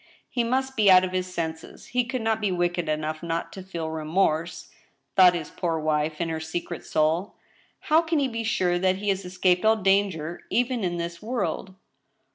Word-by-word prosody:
*' - - -41
He 240 - +3
must 265 +3 -1
be 215 -4 +4
out 185 -1 +8
of 185 - -2
his 185 0 -2
senses; 160 -2 -5
he 250 0 +1
could 245 -1 -3
not 220 0 0
be 205 -3 +1
wicked 175 -2 -1
enough 155 0 -2
not 165 0 -3
to 190 - -7
feel 170 -4 -5
remorse," 160 +1 -1 0.4
thought 180 -2 +7
his 160 -3 -5
poor 165 -2 -1
wife, 155 0 -1
in 170 -1 -1
her 160 -1 -2
secret 165 +2 -5
souL 160 +5 0 0.2
*' - - -35
How 315 +2 +6
can 325 -1 -1
he 280 -2 +2
be 230 -2 -4
sure 180 -5 +1
that 185 0 +2
he 205 +2 -3
has 195 -1 -1
escaped 180 0 +1
all 220 0 +5
danger 195 -5 0
even 245 -2 0
in 175 -1 -1
this 170 0 -5
world?" 220 -4 -3
180 Hz, 205 wpm, -25 LUFS, 165-215 Hz, 0.4 s, out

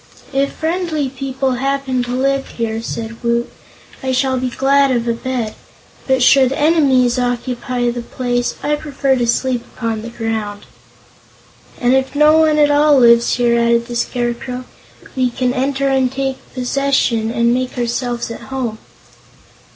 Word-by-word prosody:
"If 275 +1 0
friendly 320 -3 -2
people 265 0 -2
happen 270 0 -1
to 245 +1 -3
live 275 +1 0
here," 225 -1 -3
said 230 0 -6
Woot. 235 0 0 0.5
"I 265 - -2
shall 260 0 +1
be 255 0 -1
glad 275 +2 +3
of 240 -2 0
a 235 - +2
bed; 235 -2 -3 0.5
but 260 -2 +2
should 265 0 +5
enemies 275 -5 +3
occupy 245 0 -1
the 240 0 -5
place, 245 0 -2
I 295 0 +1
prefer 280 -2 0
to 240 -1 0
sleep 245 0 0
upon 225 -2 -3
the 230 - -7
ground." 220 -3 -4 1.1
"And 245 0 +2
if 265 +1 0
no 305 +2 +5
one 310 -1 +3
at 295 -1 +4
all 290 0 +5
lives 235 -1 +5
here," 235 -1 +2
added 235 0 +2
the 240 0 -7
Scarecrow, 245 +1 -3 0.5
"we 255 -1 +1
can 250 +1 -1
enter, 275 +1 0
and 265 -2 +2
take 270 0 -4
possession, 255 -3 0
and 235 +1 +2
make 255 +1 -2
ourselves 240 0 -2
at - - -8
home." 245 -5 -3
255 Hz, 155 wpm, -17 LUFS, 235-275 Hz, 1.1 s, should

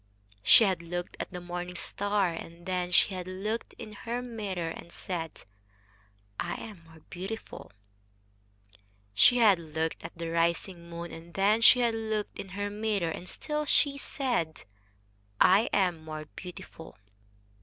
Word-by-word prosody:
She 110 - +8
had 190 -5 +2
looked 175 +1 -4
at - - -3
the 180 - -6
morning 175 0 -5
star, 200 +1 +1
and 170 +1 -9
then 180 -1 -1
she 195 - +5
had 180 -1 -5
looked 210 +5 -3
in 215 -3 -8
her 235 +4 -4
mirror 200 -8 -3
and 170 - -9
said, 165 -4 -5 1.0
"I - - -1
am 200 -7 -10
more 160 -1 -16
beautiful." 195 +5 -6 1.4
She 245 - +6
had 210 -6 +6
looked 160 0 -3
at 165 +1 -8
the 165 -1 -3
rising 170 +1 0
moon, 170 0 -6
and 165 +1 -11
then 205 +3 +4
she 250 +2 +8
had 235 -1 +3
looked 220 -2 -2
in 195 - -6
her 205 0 -1
mirror 205 -5 0
and 180 - -7
still 300 0 -3
she 285 0 +4
said, 245 - -2 0.8
"I 200 +5 +6
am 180 -5 +2
more 155 -1 -6
beautiful." 175 -2 -10
185 Hz, 150 wpm, -30 LUFS, 170-215 Hz, 1.4 s, She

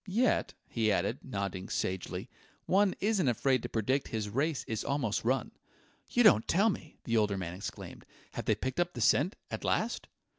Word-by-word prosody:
Yet," 230 +7 +1
he 110 -2 +1
added, 100 +5 0
nodding 100 -6 -4
sagely, 95 +2 -2 0.4
"one 195 0 +3
isn't 205 -6 +2
afraid 130 +1 +2
to - - -5
predict 130 +5 0
his 110 -2 -3
race 140 +6 0
is 110 -1 -3
almost 135 -7 -1
run." 130 +1 0 0.6
"You 245 - +3
don't 160 - +6
tell 205 +6 +4
me!" 155 -4 -8
the 115 -1 +1
older 105 -2 +2
man 85 -2 -4
exclaimed. 95 +3 -8 0.2
"Have - - -5
they - - +3
picked 130 +4 -3
up 175 0 +1
the 120 - -4
scent 150 - +3 0.2
at - - -4
last?" - - 0
125 Hz, 180 wpm, -31 LUFS, 105-165 Hz, 0.6 s, don't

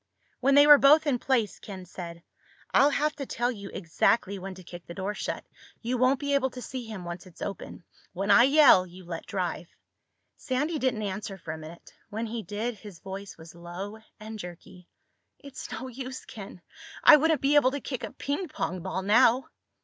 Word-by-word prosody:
When 275 +2 +3
they 285 0 +8
were 295 -1 +9
both 300 +3 +6
in 270 -5 +1
place, 235 -7 0
Ken 190 -3 -9
said, 170 -1 -9 0.5
"I'll 280 - +6
have 300 +1 0
to 275 -3 -5
tell 240 +1 -1
you 200 -4 -8
exactly 195 +3 +1
when 190 0 -7
to 185 - -12
kick 175 0 -11
the 170 - -8
door 195 +2 -3
shut. - - -4 0.4
You 240 +2 -1
won't 255 +2 +3
be 285 -1 -1
able 270 -1 +2
to 250 - -9
see 255 0 -6
him, 205 -5 -7
once 175 +2 -7
it's 175 - -10
open. 195 -3 -7 0.3
When 195 +3 -1
I 235 +4 +8
yell, 275 -10 +6
you 180 +1 -13
let 170 -1 -7
drive." 180 -3 -3 0.7
Sandy 295 +4 -1
didn't 255 -5 0
answer 195 0 -4
for 165 -3 -7
a 160 - -5
minute. 160 +2 -12 0.2
When 220 +2 -3
he 230 0 -4
did, 215 +3 -4
his 205 -4 -11
voice 195 +2 -8
was 160 0 -13
low 175 +5 -8 0.2
and 215 0 -8
jerky. 180 0 -11 0.5
"It's 280 -2 -9
no 260 - -5
use, 260 +1 -7
Ken. 195 -4 -10 0.4
I 305 - +10
wouldn't 315 0 +2
be 275 +3 +2
able 290 -3 +6
to 285 +2 -4
kick 260 -2 -5
a - - -5
ping 290 +7 -3
pong 185 - -4
ball 190 +1 -3
now." 240 +5 +4
215 Hz, 200 wpm, -27 LUFS, 185-265 Hz, 0.7 s, I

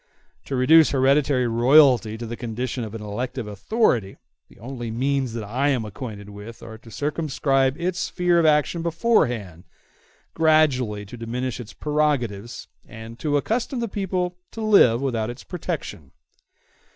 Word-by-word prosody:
To 135 - -3
reduce 155 +5 +6
hereditary 135 -1 +2
royalty 120 -2 +4
to 120 - -6
the 115 +1 -5
condition 120 +1 -4
of 110 0 -7
an 110 - -7
elective 120 +4 -4
authority, 105 - 0 0.3
the - - -19
only 120 +1 -6
means 130 +1 -1
that 115 -2 -4
I 125 +8 0
am 125 -5 0
acquainted 105 -1 -8
with 105 +3 -11
are 110 -1 -10
to 115 - -15
circumscribe 140 0 0
its 180 +1 -2
sphere 180 -2 +1
of 165 - +2
action 150 +2 +2
beforehand, 125 - 0 0.7
gradually 135 -10 +2
to 110 +5 -10
diminish 125 +3 -4
its 115 -3 -9
prerogatives, 135 -8 -2 0.2
and 115 +1 -11
to 145 -2 0
accustom 235 - -2
the 235 - -1
people 185 -3 -2 0.2
to 225 - -6
live 165 - +5
without 115 -5 -1
its 120 +2 -8
protection. 160 - -6
130 Hz, 150 wpm, -23 LUFS, 115-155 Hz, 0.7 s, reduce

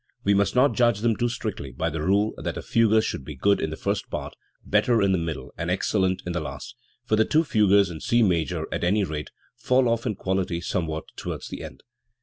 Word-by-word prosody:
We 100 - +3
must 100 +3 +2
not 130 +3 +4
judge 120 -4 +2
them 115 -1 +2
too 120 +2 0
strictly 110 - -5
by 65 - -2
the 80 0 -4
rule 100 +6 +2
that - - -4
a - - -5
fugue 110 -1 +3
should 70 - -3
be 75 +2 -8
good 100 +10 +2
in 80 - -1
the 80 - -5
first 100 0 -2
part, - - -5 0.3
better 120 -2 +3
in 100 -2 +3
the 95 - +3
middle, 80 -6 -5
and 85 +1 -2
ex 90 - 0
cellent 95 -3 +1
in 90 - -3
the 85 - -1
last, 75 -4 -7 0.3
for 110 - +2
the 110 - +4
two 155 +8 +2
fugues 100 - +3
in 80 - -7
C 120 0 +3
major, 85 -7 0
at - - -2
any 100 +4 +2
rate, 75 -4 -4 0.3
fall 125 +1 +2
off 115 +1 0
in 105 - -1
quality 95 -3 -1
somewhat 80 -3 -2
towards - - -6
the - - -7
end. - - -10
100 Hz, 235 wpm, -25 LUFS, 85-110 Hz, 0.3 s, not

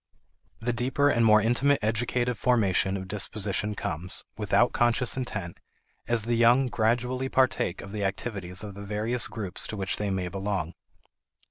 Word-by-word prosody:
The 120 +2 -1
deeper 130 +4 +1
and 120 -3 +2
more 110 -1 +6
intimate 135 +5 +3
educative 120 +2 0
formation 100 -5 +2
of 95 0 -7
disposition 105 +1 -2
comes, 90 0 -3
without - - +2
conscious 120 0 +3
intent, 100 -9 -4 0.5
as 120 -2 +3
the 120 +2 -1
young 120 +3 +4
gradually 125 +3 0
partake 130 -10 +1
of 100 - -10
the 105 -1 -3
activities 95 -2 -3
of 105 -2 -7
the 100 - -9
various 105 +4 -2
groups 100 -5 -5
to 110 - -5
which 95 -1 -2
they 105 -1 -2
may 95 -2 -2
belong. 95 -3 -3
110 Hz, 155 wpm, -27 LUFS, 100-120 Hz, 0.5 s, more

